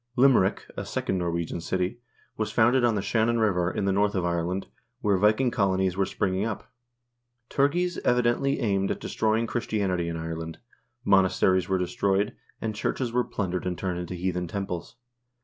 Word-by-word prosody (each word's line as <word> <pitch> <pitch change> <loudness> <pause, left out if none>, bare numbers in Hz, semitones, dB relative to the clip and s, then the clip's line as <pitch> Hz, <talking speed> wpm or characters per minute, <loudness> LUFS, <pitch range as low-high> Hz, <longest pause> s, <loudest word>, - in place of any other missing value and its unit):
Lim 135 +1 +6
erick, 95 -2 +1
a - - -4
second 95 - -2
Norwegian 85 -1 -2
city, 90 +5 -2 0.4
was 110 -1 -2
founded 120 +3 +4
on 120 -2 +3
the 100 - -1
Shannon 115 +2 +2
River, 90 -6 +2
in 100 - -2
the 100 - +2
north 100 +2 +2
of 90 -2 0
Ireland, 85 +2 -1 0.4
where 100 -2 +3
Viking 110 +6 +3
colonies 95 -3 +1
were 95 0 +1
springing 95 +1 -1
up. 110 -2 -4 0.8
Turgeis 175 +6 +1
evidently 125 +3 +2
aimed 100 -3 +1
at - - -2
destroying 110 +1 0
Christianity 100 -7 -1
in 85 - -3
Ireland; 80 0 -5 0.5
monasteries 95 -1 +3
were 95 - +2
destroyed, 95 +2 0 0.3
and 110 -1 -2
churches 115 +3 -2
were 125 +1 +2
plundered 90 -4 -3
and 90 -1 -2
turned 90 -2 -2
into 90 +1 -5
heathen 90 0 -2
temples. 90 -1 -5
95 Hz, 165 wpm, -27 LUFS, 90-110 Hz, 0.8 s, Lim